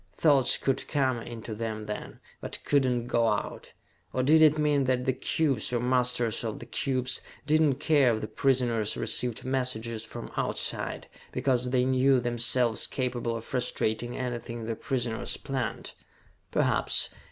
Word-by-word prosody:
Thoughts 140 -6 +4
could 135 - -1
come 130 -4 +1
in 115 -1 -8
to 110 - -5
them 110 -1 -4
then, 105 - -6 0.2
but - - -4
could 140 -2 +3
not 120 -2 0
go 120 -1 +2
out. 105 -2 -2 0.4
Or 130 - +1
did 155 +4 +5
it 155 -1 +6
mean 150 -2 +2
that 125 -1 +1
the 130 - +2
cubes, 135 -2 0
or 125 - +1
the 120 - -2
masters 125 -2 +1
of 110 -2 -3
the - - -9
cubes, 130 -2 -1 0.2
did 155 +1 +3
not 140 -4 +2
care 140 -8 +4
if 110 - -5
the 110 - -3
prisoners 120 -6 +1
received 125 -2 -2
messages 120 -4 -1
from 110 - -8
outside, - - -2 0.2
because 125 -2 0
they 125 0 +2
knew 130 0 +4
themselves 120 -1 +2
capable 120 -3 -2
of 115 - -9
frustrating 120 -2 -2
anything 120 -2 -4
the 115 0 -2
prisoners 120 -3 -2
planned? 135 -4 -4 0.6
Perhaps. - - +1
125 Hz, 165 wpm, -28 LUFS, 115-135 Hz, 0.6 s, it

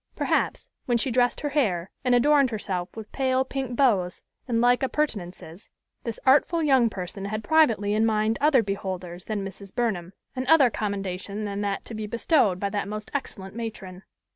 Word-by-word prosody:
Perhaps, - - 0 0.2
when 240 -2 +3
she 255 +2 -1
dressed 245 0 +2
her 290 - -1
hair, 200 - 0
and 250 -1 +3
adorned 280 +2 +4
herself 190 -5 -3
with 220 -1 -8
pale 260 -1 +1
pink 265 -2 -4
bows 205 -10 +2 0.3
and 235 -2 +1
like 245 +1 +4
appurtenances, 205 - -3 0.4
this 230 -2 -4
artful 295 +5 +4
young 265 -6 +4
person 195 0 -6
had 215 +2 -3
privately 225 -8 +3
in 215 +1 +2
mind 220 +1 +1
other 285 -5 +4
beholders 185 -3 -5
than 210 -3 -3
Mrs. 195 0 -10
Burnham, 195 -7 -1 0.2
and 255 0 -3
other 275 -5 +6
commendation 200 0 -3
than 200 0 -3
that 200 -1 -2
to - - -8
be 215 -1 -4
bestowed 230 - +2
by 200 0 -2
that 200 -1 -2
most 215 +1 -6
excellent 195 -8 -5
matron. 200 -5 -6
215 Hz, 175 wpm, -25 LUFS, 195-255 Hz, 0.4 s, other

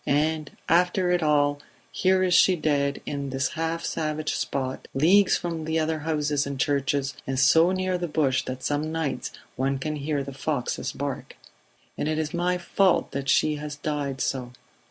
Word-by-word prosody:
And, 155 +1 +1 0.2
after 180 +2 +3
it 180 -1 +2
all, 145 -2 +2 0.3
here 185 0 +2
is 180 -1 +2
she 185 +2 +6
dead 145 -3 0
in 140 -1 -3
this 135 0 -1
half 165 0 -3
savage 155 -1 -2
spot, 130 -1 -3
leagues 185 +8 +5
from 170 -2 -4 0.2
other 160 0 0
houses 150 -2 0
and 140 -1 -5
churches, 140 0 0
and 135 0 -2
so 160 +6 +5
near 185 -1 -1
the 175 - -2
bush 145 -4 +1
that 130 0 -6
some 150 +3 -1
nights 160 -5 -2 0.2
one 135 +1 0
can 150 +3 -3
hear 145 0 -2
the 140 0 -7
foxes 135 -2 -2
bark. 140 -1 -5 0.6
And - - 0
it 155 0 0
is 155 +2 -2
my 175 +1 +1
fault 185 +1 +2
that 140 0 -3
she 150 -1 +3
has 150 0 -6
died 145 -3 -3
so 125 -2 -2
150 Hz, 175 wpm, -26 LUFS, 140-165 Hz, 0.6 s, she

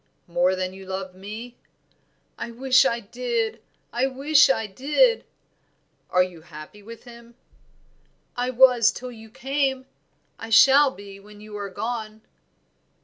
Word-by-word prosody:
"More 175 +2 +1
than 185 0 -3
you 190 0 -12
love 190 0 -5
me?" 215 +6 -9 0.8
"I - - -6
wish 260 +3 +3
I 235 -3 0
did! 230 0 -3 0.3
I 245 +3 +1
wish 280 +2 +4
I 225 -4 +1
did!" 295 - +1 0.8
"Are 180 - +4
you 180 -3 -9
happy 155 +5 -12
with 230 +3 -12
him?" 235 -1 -15 1.0
"I 245 +1 -1
was 250 -2 +5
till 250 0 -8
you 225 -1 -13
came; 265 +1 -2 0.5
I 225 - -8
shall 275 +5 +6
be 200 -5 -12
when 205 +1 -16
you 210 0 -11
are 200 -1 -5
gone." 220 +1 -5
230 Hz, 140 wpm, -24 LUFS, 200-255 Hz, 1.0 s, shall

